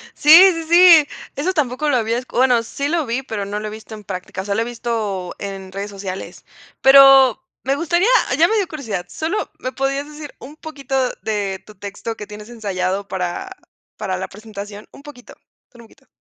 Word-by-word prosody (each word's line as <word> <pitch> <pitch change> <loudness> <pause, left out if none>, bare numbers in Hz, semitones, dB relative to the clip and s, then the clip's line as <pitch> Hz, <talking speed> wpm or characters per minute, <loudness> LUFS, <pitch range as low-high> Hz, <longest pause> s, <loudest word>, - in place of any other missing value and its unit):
Sí, 295 - -5 0.2
sí, 330 -1 -5
sí, 340 -3 +7 0.3
eso 330 +7 -1
tampoco 290 -1 -1
lo 285 - +2
había 230 0 0
bueno, 250 -2 +2
sí 280 +5 -4
lo 325 -2 -1
vi, 240 +3 -2
pero 220 -6 -5
no 205 +1 -4
lo 215 - -5
he - - -7
visto 220 +1 -10
en 210 -1 -11
práctica, 185 -1 -6
o - - -11
sea, 200 0 -2
lo 220 - 0
he - - -2
visto 225 -6 -4
en 195 -1 -7
redes 200 +2 -5
sociales, 195 -1 -8 0.4
pero 270 -2 +7 0.2
me 270 +1 0
gustaría, 345 +6 +1 0.3
ya 330 - +6
me 445 - +1
dio 400 -5 0
curiosidad, 220 - -5
solo 330 +7 -3
me 255 - -5
podrías 275 +1 -2
decir 300 -1 -10
un 290 +4 -12
poquito 290 -4 -8 0.3
de 200 -3 -3
tu 215 - -14
texto 200 +4 -6
que 210 - -8
tienes 210 +2 -11
ensayado, 200 -3 -3
para 180 - -4 0.5
para 195 -3 -3
la 190 +1 -5
presentación, 205 0 -10
un - - -15
poquito, 285 -4 -13 0.4
solo 240 -1 -16
un - - -19
poquito. 265 +3 -25
230 Hz, 200 wpm, -19 LUFS, 200-280 Hz, 0.5 s, sí